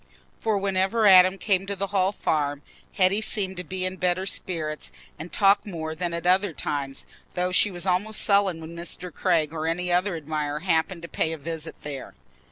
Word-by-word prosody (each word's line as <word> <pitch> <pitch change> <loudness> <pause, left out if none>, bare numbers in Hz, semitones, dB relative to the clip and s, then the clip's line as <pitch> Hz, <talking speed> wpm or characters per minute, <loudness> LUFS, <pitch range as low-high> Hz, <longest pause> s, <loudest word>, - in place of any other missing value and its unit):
For 220 -2 0
whenever 195 +3 +1
Adam 185 -1 +7
came 195 -1 0
to 200 - -2
the 195 +1 -2
Hall 190 -1 +3
Farm, 145 -7 -1 0.3
Hetty 195 +3 +3
seemed 195 -3 0
to 180 - -4
be 185 +2 -4
in 185 0 -4
better 180 +1 0
spirits 160 -5 -3 0.3
and 165 +2 -7
to - - -4
talk 200 0 +5
more 160 -5 -5
than 175 +2 -3
at 170 0 -4
other 185 0 +3
times, 140 -2 -4 0.3
though 180 0 0
she 195 - +4
was 175 -2 -5
almost 195 +4 +1
sullen 200 -5 +3
when 160 +1 -9
Mr. 175 0 -6
Craig 165 -5 +1
or 160 0 -3
any 175 +2 -1
other 180 +1 +1
admirer 150 -1 -3
happened 170 0 0
to - - -6
pay 160 -1 -1
a - - -5
visit 160 +1 -6
there. 140 -3 -7
180 Hz, 195 wpm, -25 LUFS, 160-190 Hz, 0.3 s, Adam